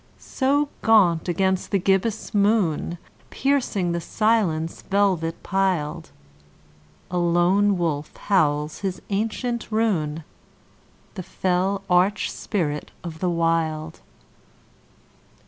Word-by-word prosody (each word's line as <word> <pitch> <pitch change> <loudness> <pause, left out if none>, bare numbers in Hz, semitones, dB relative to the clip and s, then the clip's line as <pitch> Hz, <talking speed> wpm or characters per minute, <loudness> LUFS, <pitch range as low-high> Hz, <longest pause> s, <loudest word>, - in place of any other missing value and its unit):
So 285 +2 0
gaunt 185 -7 +4
against 190 +1 0
the 200 - +2
gibbous 195 +4 0
moon, 200 -5 +1 0.3
Piercing 250 -10 0
the 170 0 -2
silence 185 -7 0
velvet 190 -5 0
piled, 175 -5 -1 1.0
A 180 - 0
lone 180 +4 +3
wolf 155 -4 -2
howls 150 -6 +1
his 190 -3 -3
ancient 225 +4 -2
rune— 165 -9 0 0.9
The 190 - -6
fell 190 +2 -1
arch 185 +3 +2
spirit 150 -7 -3
of 165 -2 -7
the 180 - 0
Wild. 165 -2 -1
185 Hz, 95 wpm, -23 LUFS, 165-205 Hz, 1.0 s, gaunt